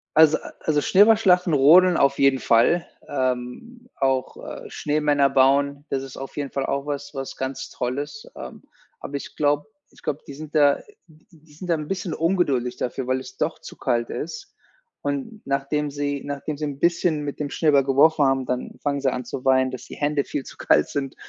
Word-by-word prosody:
Also 155 0 +6
a - - -11
also, 150 -2 +1
Schneeballschlachten, 190 -4 +4
Rodeln 170 +6 +6
auf 140 0 +3
jeden 135 -1 +4
Fall, 120 +11 +3 0.2
ähm, 130 - -3
auch, 135 -1 0
äh, - - -9
Schneemänner 145 -2 +1
bauen, 140 +2 +2
das 135 -1 -2
ist 135 -1 -10
auf 135 - -8
jeden 145 -2 -4
Fall 135 -1 -2
auch 140 0 -2
was 145 0 -5
was 135 -1 -6
ganz 130 0 -4
Tolles, 145 - -4
ähm, - - -9 0.4
aber 140 - -7
ich 140 - -6
glaube 145 0 +1 0.2
ich - - -21
glaube, 145 - -2
die - - -8
sind 155 +2 -10
da 145 -2 +6
n - - -7 0.3
n 155 +4 -22
die 160 -2 -21
sind 170 +5 -9
da 170 - +3
'n 155 -2 -5
bisschen 185 -2 -3
ungeduldig 145 -9 0
dafür, 125 +1 -3
weil 130 0 +1
es 130 - -11
doch - - -2
zu - - -11
kalt 120 0 -1
ist. 170 - -6 0.5
Und 145 +10 -4
nachdem 140 +2 -1
sie 145 -1 -2
nachdem 145 +1 -4
sie 150 - -3
'n 140 -2 -5
bisschen 170 -2 +1
mit 145 -1 -5
dem 145 -1 -2
Schneeball 145 -3 +3
geworfen 145 +2 +4
haben, 135 -1 +1
dann 125 0 -4
fangen 140 -1 -1
sie 135 -1 +2
an 125 0 -4
zu 125 +2 -6
weinen, 130 -1 +3
dass 130 - -8
die - - -10
Hände 145 -1 0
viel 145 - -4
zu - - -12
kalt - - +3
sind 135 -2 -3
145 Hz, 205 wpm, -23 LUFS, 135-155 Hz, 0.5 s, Also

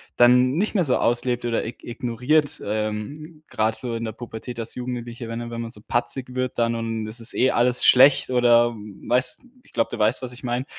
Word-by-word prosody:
dann 125 +1 +5
nicht 210 +5 -1
mehr 190 - +3
so 130 -5 +3
auslebt 120 +1 0
oder 120 -1 -1
ig 115 - -9
ignoriert, 125 +5 -1
ähm, 110 +10 -5
grad 110 +1 0
so 115 +1 -1
in 115 - -4
der 110 - -4
Pubertät 120 +1 -9
als 115 0 -2
Jugendliche, 120 -1 -6
wenn 115 +1 -6
wenn 115 0 -5
man 115 -1 -6
so 105 - -6
patzig 125 +3 -1
wird 130 -1 -3
dann 115 0 +1
und 115 -1 -4
das 110 +3 -2
ist 115 +1 +3
eh 130 - +2
alles 125 0 +2
schlecht, 135 +2 +6
oder 120 -1 +3 0.3
weißt 125 +1 +2 0.2
ich - - -24
glaube, 115 - 0
du - - -5
weißt, 110 +4 +2
was 130 -1 -4
ich 125 - -12
meine. 125 +1 -2
120 Hz, 210 wpm, -23 LUFS, 115-125 Hz, 0.3 s, schlecht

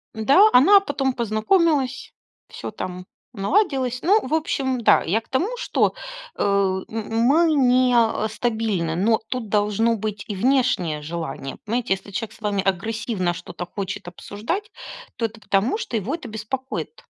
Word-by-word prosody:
Н-да, 280 - +5
она 385 +11 +7
потом 275 -7 -1
познакомилась, 260 - +1 0.3
всё - - -7
там 180 -3 -6 0.3
наладилось. 255 - 0
Ну, 410 +6 +3
в 265 - -4
общем, 270 -5 0
да, 235 - +4
я 195 +7 +1
к 225 - -21
тому, 330 +11 0
что, - - +1 0.4
э, - - -4
м 195 -2 +1
м 225 0 -3
мы 310 +8 +4
не, 255 -2 +3
а, 225 -2 +2
стабильны, 220 -7 -1
но 215 +5 +2
тут 250 -4 -4
должно 210 +2 +2
быть 210 -1 -4
и 205 - -3
внешнее 230 - +1
желание. 155 -3 -5
Понимаете, 235 0 0
если 195 +1 -7
человек 220 +2 -4
с - - -18
вами 205 -2 -1
агрессивно 200 -1 -1
что-то 175 0 -7
хочет 195 +1 -6
обсуждать, 225 - -5 0.5
то 230 - 0
это 225 0 -6
потому, 205 - +1
что 245 - -3
его 220 - -2
это 305 -8 -9
беспокоит. 255 +5 -5
225 Hz, 155 wpm, -22 LUFS, 200-265 Hz, 0.5 s, она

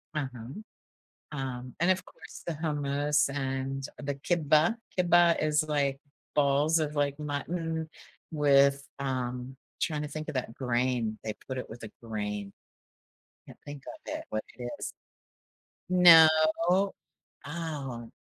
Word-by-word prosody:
Uh-huh. 130 -6 -4 0.9
Um, 125 -2 -5
and, 175 +3 +3
of 185 0 0
course, - - -13
the 170 - -2
hummus 145 -2 +1
and 135 0 -2 0.2
the 140 0 -2
كِبّة. 155 +5 +2 0.2
كِبّة 175 -1 +5
is, 155 0 +2
like, 140 -2 0 0.4
balls 145 +3 +3
of, 150 -1 -2
like, 145 -1 +1
mutton 160 +2 -3 0.4
with, 140 -2 +4
um 130 -1 -3 0.3
tryna 150 -2 -1
think 155 +1 -5
of - - -6
that 125 -3 -2
grain, 120 -3 0
they 110 - -2
put 130 - -4
it 125 - -5
with 120 - -10
a 110 - -7
grain. 105 -3 -4 0.9
Can't - - -13
think 145 -2 -8
of - - -6 0.2
it, - - -6
what 110 0 -1
it 125 - -7 0.2
is. - - -5 1.0
No. 175 -3 +9 1.2
Oh, 145 -7 -5
140 Hz, 130 wpm, -29 LUFS, 130-155 Hz, 1.2 s, No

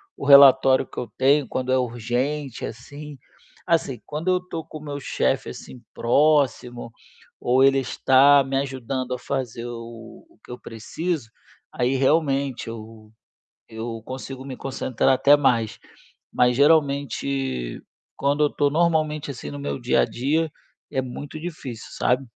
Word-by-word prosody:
o - - -7
relatório 135 -2 +7
que - - -8
eu 120 - -4
tenho, 135 0 +3
quando 130 0 -3
é 130 - +4
urgente, 125 +3 -2
assim. 145 +5 -8 0.5
Assim, 160 -8 0
quando 155 +4 -6
eu 180 0 +3
tô 170 -3 -7
com 155 -1 -10
o - - -12
meu 145 -1 -5
chefe, - - -1
assim, 125 - -10
próximo, 125 -3 +1 0.5
ou 130 +2 +3
ele 135 0 +5
está 135 +2 +4
me 135 0 -4
ajudando 130 -1 -3
a - - -9
fazer 120 -3 -4
o 115 - -9
o 340 - -26
que - - -12
eu 125 - -7
preciso, 130 +4 -4 0.4
aí 125 +2 0
realmente 135 -2 +1
eu 110 -1 -10 0.6
eu 115 0 -6
consigo 130 0 -7
me 130 -2 -6
concentrar 130 -2 -1
até 140 +2 +5
mais. 120 -6 +1 0.5
Mas, 125 0 +3
geralmente, 140 - +1 0.4
quando 145 +2 +1
eu 145 - +2
tô 145 -1 +1
normalmente, 155 -2 +1
assim, 95 - -7
no 70 - -7
meu 70 0 -4
dia - - +2
a - - +4
dia, 155 +6 -1 0.4
é 130 - -1
muito 145 +4 -7
difícil, 150 -9 -7
sabe. 130 +2 0
135 Hz, 150 wpm, -23 LUFS, 120-145 Hz, 0.6 s, relatório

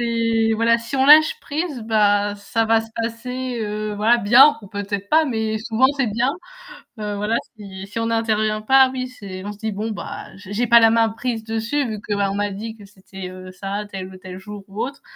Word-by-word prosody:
C'est, 230 -1 +1
voilà, 230 +1 +3
si 235 +3 -7
on 265 0 +3
lâche 310 +10 +7
prise, 295 -3 -4
bah, 205 -2 +2
ça 225 +3 -1
va 225 0 +3
se 225 - -8
passer, 240 +2 -4
heu, 210 0 -3
voilà, 225 +3 +4
bien 245 +8 +6
ou 200 - -12
peut-être 200 -1 -4
pas, 315 +1 +4
mais 220 -4 -2
souvent 225 +3 +2
c'est 270 -3 +1
bien. 235 +5 0 0.7
Heu, 210 -1 -3
voilà, 210 +3 0 0.2
si 195 -2 -9
si 205 +3 -6
on 230 - -1
n'intervient 215 -2 0
pas, 265 +3 +5
oui 255 -1 -3
c'est 195 -6 -9
on 205 - -5
se 205 - -14
dit: 220 -1 -3
«Bon 215 +3 -3
bah - - -7
j'ai 205 +5 -3
pas 235 +1 +7
la 225 0 +6
main 225 0 +3
prise 225 0 -4
dessus 230 +5 -1
vu 215 -2 -5
que 205 - -3
on 200 -1 0
m'a 205 0 -1
dit 220 +3 -6
que 205 - -14
c'était 190 -2 -10 0.2
ça, 200 +2 -4
tel 190 -1 -6
ou - - -11
tel 185 0 -9
jour 205 +1 -9
ou 200 +3 -4
autre» 275 +2 -8
220 Hz, 220 wpm, -21 LUFS, 205-235 Hz, 0.7 s, lâche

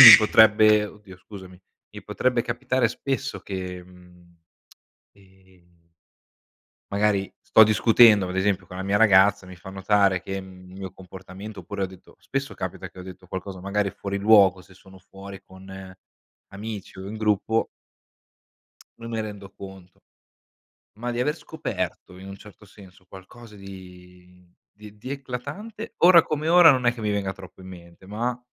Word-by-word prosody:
mi 120 -4 +13
potrebbe 110 0 +5
oddio 100 -3 -14
scusami, 95 -2 -13 0.3
mi - - -11
potrebbe 125 -2 -1
capitare 120 0 -1
spesso 135 +3 -4
che, 90 -2 -6
mhmm, 90 -1 -20 0.8
ehm 95 -3 -26 1.0
magari 100 -1 0
sto 110 - +5
discutendo, 110 -1 +5
vado 90 +1 -5
a - - +1
esempio, 95 -2 -1
con 90 - -10
la 95 - -4
mia 100 +1 0
ragazza, 100 -2 +4
mi 90 -1 -12
fa 90 +2 -11
notare 95 -1 +1
che 95 0 -5
mhmm, 90 -1 -14
il 95 - -12
mio 95 -2 -7
comportamento, 95 +3 -11
oppure 100 -1 -6
ho - - 0
detto 95 0 -17
spesso 135 0 -4
capita 95 0 -6
che - - -18
ho - - -8
detto 90 0 -12
qualcosa 95 0 -7
magari 100 +1 -1
fuori 100 +1 -5
luogo, 100 -3 +5
se 95 - -20
sono 95 0 -17
fuori 95 +1 -12
con 95 0 -12 0.6
amici 105 -1 -8
o 95 - -8
in 110 - -7
gruppo 110 +1 0 1.3
non 115 0 -9
me 115 -1 -3
rendo 100 -2 -8
conto. 95 -2 -13 1.0
Ma 120 +2 -4
di 120 - -4
aver 150 +4 0
scoperto, 90 - -6
in 95 +1 -11
un 95 - -8
certo 105 +1 -16
senso, 95 -1 -18
qualcosa 105 +4 -14
di 90 -2 -14 0.3
di 105 0 -13
di 125 +5 -9
eclatante, 140 - -7
ora 175 -1 +8
come 155 +1 -3
ora 175 -1 +8
non 130 -2 0
è 120 - +3
che 115 - -10
mi 105 - -1
venga 100 -2 -2
troppo 95 -1 -14
in 95 - -12
mente, 85 0 -14
ma 115 +5 -3
100 Hz, 165 wpm, -24 LUFS, 95-110 Hz, 1.3 s, mi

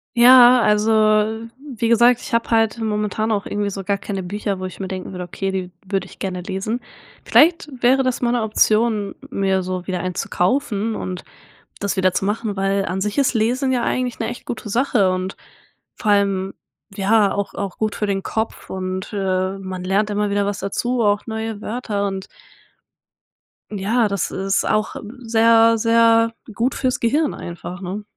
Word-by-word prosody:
Ja, 245 0 +8
also 210 0 +2 0.7
wie 260 -5 -4
gesagt, 235 +1 +5
ich - - -9
habe 230 0 +1
halt 225 0 +2
momentan 215 0 -1
auch 205 -1 -1
irgendwie 205 0 -2
so 195 0 -5
gar 200 +1 0
keine 195 -1 -5
Bücher, 200 +1 -3
wo 185 - -4
ich 185 +1 -8
mir 190 - -4
denken 185 -1 -5
würde, 180 -1 -5
okay, 195 +2 -4
die 185 -1 -4 0.2
würde 195 -2 -1
ich - - -15
gerne 185 -2 -3
lesen. 195 +6 -3 0.4
Vielleicht 330 -1 +4
wäre 260 +2 +4
das 255 -1 -1
mal 240 0 +1
'ne 245 - +1
Option, 215 -1 +1
mir 190 -1 0
so 185 0 -4
wieder 185 -2 -2
eins 185 0 -3
zu - - -3
kaufen 220 +1 0
und 185 -1 -5 0.6
das 200 0 -1
wieder 185 -1 +2
zu - - -1
machen, 210 +1 -2
weil 195 0 0
an 185 +3 -3
sich 210 +4 -2
ist 275 -2 +2
Lesen 250 +4 +1
ja 245 -2 0
eigentlich 250 -2 -1
'ne - - -1
echt - - -8
gute 220 -2 -6
Sache 230 -4 +2
und 185 +1 -3 0.6
vor 210 - 0
allem 195 -2 +1 0.4
ja 205 +1 +3
auch 200 0 -3
auch 200 -2 -5
gut 215 -1 -1
für 210 - -2
den 195 -1 -1
Kopf 220 0 -4
und, 185 0 -4
äh, 190 -1 -1
man 185 -1 -6
lernt 200 +3 +1
immer 205 0 0
wieder 200 0 +1
was 205 0 -2
dazu, 240 +5 -1
auch 205 -1 +1
neue 220 -1 -4
Wörter 215 -4 -2
und 195 -1 -5 1.5
ja, 215 +4 +1
das 200 -2 -2
ist 195 +1 0
auch 215 0 0 0.2
sehr, 230 -1 +4
sehr 230 0 +4 0.2
gut 235 +5 0
für's 255 -1 -1
Gehirn 290 +6 +1
einfach, 175 +1 -7
ne? 195 +3 -5
205 Hz, 185 wpm, -20 LUFS, 195-230 Hz, 1.5 s, Ja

